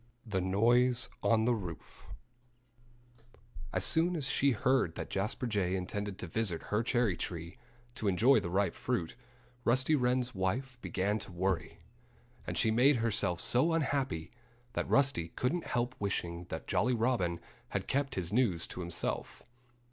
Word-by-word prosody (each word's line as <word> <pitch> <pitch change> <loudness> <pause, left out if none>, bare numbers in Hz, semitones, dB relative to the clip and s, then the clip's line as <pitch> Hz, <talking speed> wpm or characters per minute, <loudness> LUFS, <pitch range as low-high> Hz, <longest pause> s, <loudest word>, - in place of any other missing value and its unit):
XI 115 - -15
THE 95 -2 +1
NOISE 120 +6 +3
ON 110 -1 +3
THE 120 - +3
ROOF 90 -8 -7 1.6
As - - 0
soon 170 +2 +3
as 150 -5 -2
she 135 +1 +2
heard 125 -6 +2
that - - -6
Jasper 105 +6 -2
Jay 100 -5 0
intended 100 +2 -4
to - - -5
visit 90 -2 -1
her 105 - +3
cherry 120 -5 +1
tree, 85 +4 -5 0.3
to 110 - -3
enjoy 115 +9 +5
the 85 - -4
ripe 95 0 +1
fruit, 85 -2 -2 0.5
Rusty 130 +6 +2
Wren's 125 -1 +1
wife 120 +7 -2
began 100 +1 -1
to 100 - -7
worry. 95 +1 -1 0.7
And - - -3
she 110 - +3
made 130 +6 +5
herself 105 -6 0
so 130 - +2
unhappy 135 - -1 0.4
that - - -2
Rusty 135 -12 +3
couldn't 165 +8 -1
help 120 +1 -1
wishing 90 -4 -2
that - - -6
Jolly 125 +2 +1
Robin 110 -8 +1 0.3
had - - -2
kept 140 +1 0
his 90 0 -2
news 105 -9 +2
to - - -7
himself. 85 -1 -3
110 Hz, 155 wpm, -32 LUFS, 95-125 Hz, 1.6 s, enjoy